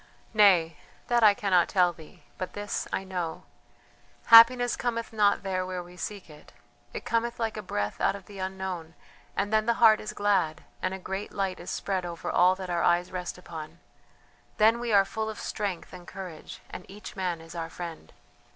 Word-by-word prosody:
"Nay! 180 -7 +5 0.3
that 240 -1 +3
I 210 -2 +7
cannot 185 -5 +2
tell 180 -2 +3
thee, 165 +2 -16 0.2
but 185 - -4
this 205 0 -3
I - - -1
know: 180 -4 -4 0.9
Happiness 245 +2 +8
cometh 230 -2 -3
not 205 -2 +3
there 185 -1 -1
where 185 -1 -4
we 175 +1 -14
seek 200 +1 -6
it; 150 -2 -16 0.4
it - - -7
cometh 235 +1 -1
like 225 -1 -1
a 215 - -4
breath 105 - -3
out - - +2
of 200 -2 -10
the 200 -2 -11
unknown, 185 -3 -5 0.4
and 205 +2 -1
then 215 0 +2
the 235 - +3
heart 220 -2 +6
is 215 - -5
glad 190 -7 0 0.2
and 185 +1 -1
a - - -6
great 190 +2 -5
light 195 -2 -2
is - - -8
spread 190 -2 -2
over 170 -1 -5
all 180 +1 +4
that 185 -1 -6
our 170 -1 0
eyes 175 +1 +2
rest 180 -1 -5
upon. 160 -2 -9 0.8
Then 225 +2 +5
we 240 -1 -2
are 200 -2 +6
full 220 +2 -3
of 220 - -7
strength 200 -5 -4
and 180 -1 -11
courage, 185 -4 -9
and - - -7
each 200 0 -10
man 180 -3 -2
is 165 +1 -12
our 165 -1 -4
friend. 165 - -8
190 Hz, 195 wpm, -28 LUFS, 175-210 Hz, 0.9 s, Happiness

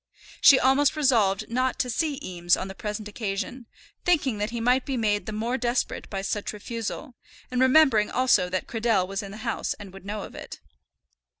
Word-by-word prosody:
She 275 - +8
almost 270 +3 +3
resolved 230 -10 +2
not 255 +2 0
to - - 0
see 290 +2 -1
Eames 175 -1 +1
on 185 - -4
the 195 - -7
present 210 +1 -5
occasion, 210 +3 -4 0.4
thinking 295 -11 +1
that 210 +1 -1
he 235 0 -4
might 250 +3 +2
be 270 -2 -3
made 210 -2 0
the - - -3
more 230 +4 -2
desperate 240 +1 -2
by 195 -1 -4
such 205 +2 -3
refusal, 230 +6 -5 0.4
and 250 0 0
remembering 260 -5 +5
also 250 -8 +3
that 185 0 -2
Cradell 225 -5 +1
was 195 +2 -3
in 200 - -8
the 200 - -9
house 230 - -2
and 200 -3 -11
would 195 - -12
know 210 0 -4
of - - -10
it. - - -9
225 Hz, 195 wpm, -26 LUFS, 205-255 Hz, 0.4 s, She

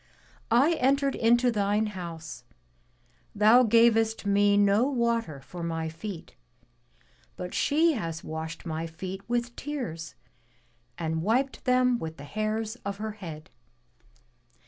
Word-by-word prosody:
I 255 +8 +4
entered 275 +1 +2
into 240 +2 +3
thine 210 0 +1
house; 165 -6 -7 0.9
thou 215 +4 +6
gavest 225 -1 +3
me 200 0 +3
no 205 +4 +4
water 235 - -1
for 175 +5 -9
my 165 -1 -2
feet; 165 +2 -8 1.0
but 180 - -6
she 320 +3 +3
has 165 - -4
washed 160 +2 -6
my 160 0 -3
feet 185 +4 -7
with 240 0 -1
tears 205 - -5 0.8
and 160 -1 -2
wiped 250 +9 0
them 250 -1 +3
with 160 0 -6
the 140 - -10
hairs 215 +6 -3
of 200 -3 -5
her 215 +1 -4
head. 165 -7 -9
210 Hz, 125 wpm, -27 LUFS, 165-240 Hz, 1.0 s, thou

